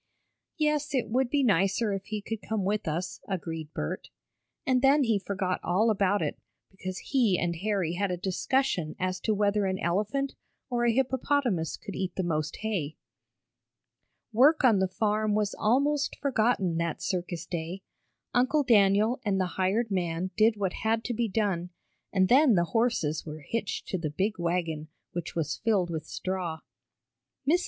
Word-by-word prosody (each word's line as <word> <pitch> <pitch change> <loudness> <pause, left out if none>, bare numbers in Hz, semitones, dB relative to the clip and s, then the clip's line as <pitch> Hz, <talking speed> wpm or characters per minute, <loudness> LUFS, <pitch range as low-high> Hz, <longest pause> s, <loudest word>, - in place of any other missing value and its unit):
"Yes, 300 -2 +1
it 250 -4 0
would 255 +2 +1
be 280 +1 +2
nicer 200 0 +2
if 195 0 -4
he 215 -1 -4
could 225 0 -4
come 220 -2 -2
with 205 -1 -1
us," 175 +4 -3
agreed 165 -5 -4
Bert. 75 - -4 0.6
And 255 -1 +3
then 275 +2 +5
he 225 -4 +2
forgot 190 -2 -2
all 215 +6 +3
about 200 -1 +2
it, - - -3 0.3
because 185 -1 -6
he 235 -9 +2
and 170 -1 -1
Harry 190 -3 0
had 195 +2 0
a 180 - -1
discussion 185 - 0
as 185 0 -1
to 215 - 0
whether 205 0 +2
an 190 0 -1
elephant 210 +12 -1 0.4
or 240 -1 +1
a 235 - +4
hippopotamus 260 - 0
could 200 - -8
eat 185 -2 -3
the 190 - -1
most 155 -2 -1
hay. 185 -9 -2 1.4
Work 285 +7 +5
on 225 -6 +5
the 190 - +2
farm 215 +2 0
was 210 -1 0
almost 280 +6 +1
forgotten 220 - +1
that 170 -2 -1
circus 175 -2 -3
day. 175 +3 -5 0.5
Uncle 260 +5 +3
Daniel 215 +2 +4
and 200 -4 +1
the 185 - +2
hired 205 +4 0
man 180 -1 -1
did 220 0 +4
what 195 -3 -1
had 225 +1 +1
to 245 - -2
be 235 0 0
done, 190 -4 -1 0.4
and 190 -2 +3
then 260 0 +6
the 170 - +4
horses 225 -10 +1
were 155 0 -8
hitched 230 -3 -3
to 185 - -1
the 160 -2 -2
big 190 +7 -1
wagon, 170 -3 -1 0.2
which 175 -1 -5
was 165 -4 -1
filled 200 -6 +1
with 160 -2 -4
straw. 180 -4 -3 0.9
Mrs. 340 +5 +5
200 Hz, 170 wpm, -28 LUFS, 180-230 Hz, 1.4 s, then